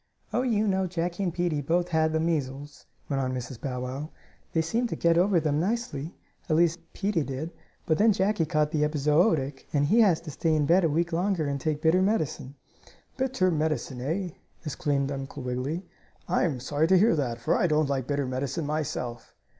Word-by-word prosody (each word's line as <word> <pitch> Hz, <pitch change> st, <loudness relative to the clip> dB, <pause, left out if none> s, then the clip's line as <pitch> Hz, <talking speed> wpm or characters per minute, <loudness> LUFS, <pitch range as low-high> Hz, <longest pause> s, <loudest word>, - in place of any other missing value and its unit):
"Oh, 245 Hz, -, +2 dB
you 220 Hz, -4 st, +1 dB
know 190 Hz, -1 st, +1 dB
Jackie 175 Hz, +1 st, -3 dB
and 185 Hz, -3 st, 0 dB
Peetie 170 Hz, -3 st, -1 dB
both 175 Hz, +5 st, 0 dB
had 160 Hz, -1 st, +2 dB
the 160 Hz, -, +1 dB
measles," 145 Hz, -3 st, -3 dB, 0.2 s
went 135 Hz, -2 st, -1 dB
on 130 Hz, -1 st, -1 dB
Mrs. 125 Hz, -1 st, -6 dB
Bow 125 Hz, -2 st, -3 dB
Wow. 135 Hz, +4 st, -5 dB, 0.4 s
"They 160 Hz, -, +1 dB
seemed 230 Hz, +8 st, 0 dB
to -, -, -2 dB
get 170 Hz, 0 st, +3 dB
over 180 Hz, +1 st, +4 dB
them 150 Hz, -2 st, 0 dB
nicely, 195 Hz, -, -2 dB, 0.3 s
at 155 Hz, -, +3 dB
least 170 Hz, +1 st, +3 dB
Peetie 195 Hz, -4 st, 0 dB
did, 140 Hz, +4 st, -4 dB, 0.3 s
but 155 Hz, -, +1 dB
then 220 Hz, +2 st, +6 dB
Jackie 190 Hz, -4 st, +1 dB
caught 150 Hz, 0 st, +1 dB
the 150 Hz, -2 st, +1 dB
epizootic, 150 Hz, -1 st, +1 dB
and 145 Hz, -1 st, +2 dB
he 215 Hz, +11 st, +4 dB
has 195 Hz, -8 st, +5 dB
to 165 Hz, -2 st, -7 dB
stay 160 Hz, +2 st, +1 dB
in 150 Hz, -1 st, +2 dB
bed 175 Hz, +5 st, +4 dB
a 165 Hz, -, +3 dB
week 170 Hz, +3 st, 0 dB
longer, 180 Hz, -1 st, +1 dB
and 140 Hz, -1 st, -2 dB
take 155 Hz, 0 st, -2 dB
bitter 165 Hz, +3 st, +4 dB
medicine." 160 Hz, -9 st, -1 dB, 0.6 s
"Bitter 260 Hz, -9 st, +1 dB
medicine, 155 Hz, -5 st, -1 dB
eh?" 175 Hz, +8 st, -2 dB, 0.4 s
exclaimed 145 Hz, -2 st, -1 dB
Uncle 135 Hz, -1 st, -6 dB
Wiggily. 130 Hz, +8 st, -3 dB, 0.4 s
"I -, -, +2 dB
am 145 Hz, -7 st, -1 dB
sorry 145 Hz, +5 st, 0 dB
to 190 Hz, +2 st, +5 dB
hear 215 Hz, +3 st, +4 dB
that, 125 Hz, -6 st, -1 dB
for 115 Hz, -, +1 dB
I -, -, +2 dB
don't 155 Hz, -1 st, +2 dB
like 135 Hz, -3 st, -1 dB
bitter 145 Hz, -1 st, 0 dB
medicine 130 Hz, +5 st, -2 dB
myself." 140 Hz, -5 st, -4 dB
155 Hz, 200 wpm, -27 LUFS, 140-175 Hz, 0.6 s, then